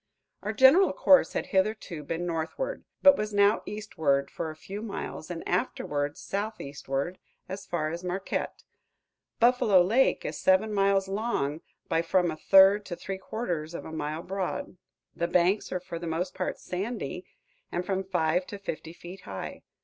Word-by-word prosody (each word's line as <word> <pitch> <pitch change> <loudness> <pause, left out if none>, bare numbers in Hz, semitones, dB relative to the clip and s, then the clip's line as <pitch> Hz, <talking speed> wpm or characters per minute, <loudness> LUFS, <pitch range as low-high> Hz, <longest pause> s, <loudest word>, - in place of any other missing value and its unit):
Our 210 - -2
general 280 - +6
course 280 0 +5
had - - -1
hitherto 190 -4 0
been 165 +4 -3
northward, 175 - -3 0.2
but 280 -1 +9
was 210 -3 -3
now 200 +1 +4
eastward 160 -10 -1
for 160 - -4
a 155 - -7
few 195 +6 -7
miles 200 -6 -6
and 170 -2 -5
afterward 145 -4 -1
southeastward 175 -6 -4 0.3
as 195 +1 -7
far 155 -3 -1
as 170 +2 -5
Marquette. 185 +2 -3 0.8
Buffalo 235 -5 +5
Lake 230 +9 +2
is 150 - -4
seven 195 +3 +3
miles 195 -1 +2
long 195 -8 -1 0.3
by 165 - +2
from 175 0 +2
a - - -5
third 195 +5 +6
to 175 - -4
three 190 +2 -6
quarters 175 -7 -4
of - - -6
a - - -7
mile 155 +1 -3
broad. 190 -1 -3 0.4
The 170 - -1
banks 180 +4 +2
are 185 - -1
for 170 -1 -7
the 170 - -5
most 170 +3 -2
part - - -3
sandy, 185 - -4 0.5
and 175 +1 -2
from 195 -1 -1
five 180 -1 0
to 205 - -6
fifty 165 -4 -6
feet 175 +2 -11
high. 95 -1 -7
185 Hz, 165 wpm, -28 LUFS, 165-205 Hz, 0.8 s, but